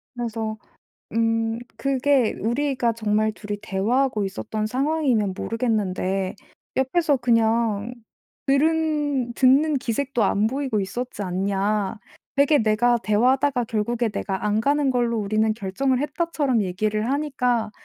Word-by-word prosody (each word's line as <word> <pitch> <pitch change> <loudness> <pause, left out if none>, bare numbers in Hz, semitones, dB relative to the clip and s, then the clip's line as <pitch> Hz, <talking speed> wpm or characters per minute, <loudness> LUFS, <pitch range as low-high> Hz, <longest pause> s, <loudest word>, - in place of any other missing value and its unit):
그래서 225 -2 -3 0.6
"음 225 0 +1 0.2
그게 270 0 +2
우리가 250 +1 0
정말 215 -1 +1
2 210 -1 -7
이 205 - -3
대화하고 215 +3 0
있었던 215 +2 -3
상황이면 255 -5 0
모르겠는데 195 -5 -1 0.4
옆에서 285 +3 +2
그냥 230 -2 +1 0.5
들은 290 -3 +1
듣는 275 +5 +4
기색도 255 -1 -1
안 205 +2 +2
보이고 260 -4 -1
있었지 210 +3 -4
않냐. 195 +2 -1 0.4
되게 285 +1 +4
내가 230 +2 +3
대화하다가 250 +4 +2
'결국에 225 +2 -1
내가 200 -2 -3
안 210 +1 +1
가는 285 +2 +2
걸로 240 -2 +1
우리는 215 +1 +1
결정을 235 +6 -1
했다.'처럼 295 -5 0
얘기를 215 +4 -1
하니까 250 -6 0
230 Hz, 280 characters per minute, -23 LUFS, 215-270 Hz, 0.6 s, 듣는